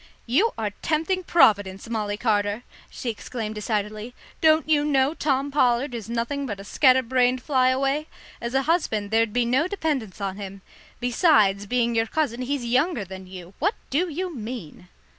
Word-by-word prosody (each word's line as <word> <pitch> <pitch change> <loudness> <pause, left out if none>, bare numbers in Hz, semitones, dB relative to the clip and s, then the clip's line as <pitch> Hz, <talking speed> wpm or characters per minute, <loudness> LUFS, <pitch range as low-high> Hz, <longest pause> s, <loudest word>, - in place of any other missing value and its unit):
"You 340 - +2
are 215 -2 -2
tempting 335 +4 0
Providence, 205 - +3
Molly 210 -3 -2
Carter," 210 -1 0 0.3
she 240 - -4
exclaimed 220 0 -5
decidedly. 215 +2 -3 0.3
"Don't 315 -2 +4
you 300 -2 +3
know 280 -1 +2
Tom 280 -3 0
Pollard 250 -1 +2
is 230 -2 -6
nothing 240 +4 -2
but 205 -4 -5
a - - -8
scatter 260 +4 +4
brained 250 +1 +1
fly 260 -3 +3
away? 275 +4 0 0.3
As 235 +2 -4
a 270 - +3
husband 225 - 0
there'd 225 -1 +2
be 245 +2 +1
no 260 +8 +2
dependence 300 - -3
on 195 -1 -3
him. 195 -1 -8 0.4
Besides 220 - +3
being 235 0 +1
your 225 0 +1
cousin, 255 -3 -1
he's 260 0 -2
younger 255 - +1
than 190 0 -9
you. 185 0 -10
What 400 +8 +1 0.2
do 340 +7 +1
you 350 +2 -4
mean?" 215 - -7
245 Hz, 170 wpm, -24 LUFS, 210-285 Hz, 0.4 s, Don't